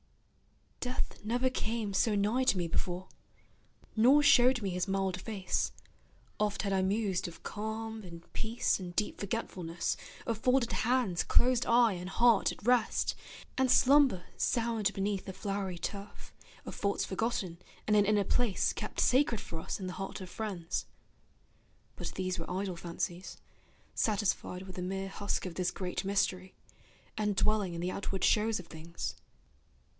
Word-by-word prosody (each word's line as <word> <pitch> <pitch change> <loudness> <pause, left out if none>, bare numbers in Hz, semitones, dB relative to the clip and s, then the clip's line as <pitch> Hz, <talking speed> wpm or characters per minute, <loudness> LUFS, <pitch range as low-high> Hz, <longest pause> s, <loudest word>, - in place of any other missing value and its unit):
Death 250 -3 -3
never 245 +4 +1
came 220 -4 -2
so 210 +2 +3
nigh 210 +6 +2
to 205 - +4
me 175 -2 0
before, 180 +2 -2 0.9
Nor 260 +7 +6
showed 250 -3 +6
me 195 - -1
his 180 +1 -1
mild 190 -1 -1
face: 195 -5 -1 0.7
oft 210 0 0
had 200 -1 0
I 190 - +3
mused 195 -1 0
Of 170 - -11
calm 220 +1 -4
and 170 -3 -10
peace 225 -1 0
and 175 -2 -7
deep 210 - -1
forgetfulness, 180 -5 -2 0.3
Of 230 -2 -1
folded 250 0 +2
hands, 240 -7 +1
closed 250 0 +3
eye, 235 -2 +5
and 180 0 -5
heart 235 0 +4
at - - -11
rest, 245 -2 +3 0.5
And 260 -1 +3
slumber 265 -8 +5
sound 225 -4 +1
beneath 195 0 -2
a - - -5
flowery 195 -2 -3
turf, 200 +4 -6 0.3
Of - - -6
faults 200 0 0
forgotten, 190 -4 -2 0.3
and 210 - +3
an 205 -1 +5
inner 205 0 +3
place 225 0 +1
Kept - - -5
sacred 255 -3 +3
for 165 - -6
us 160 - -4
in 190 - -4
the 180 - -4
heart 195 +1 -5
of 185 -2 -8
friends; 190 -7 -3 1.1
But - - -6
these 185 -1 -2
were 165 - -5
idle 190 0 -2
fancies, 170 +1 -4 0.6
satisfied 200 -3 0
With 185 -1 -10
the - - -3
mere 195 +1 -3
husk 200 0 -2
of 180 - -4
this 180 +1 0
great 180 -2 -3
mystery, 190 -1 0 0.6
And 210 -1 +1
dwelling 200 -3 +1
in 170 - -4
the 180 +1 -1
outward 195 -1 -3
shows 220 0 +3
of 180 - -9
things. 165 +1 -6
200 Hz, 160 wpm, -32 LUFS, 185-225 Hz, 1.1 s, Nor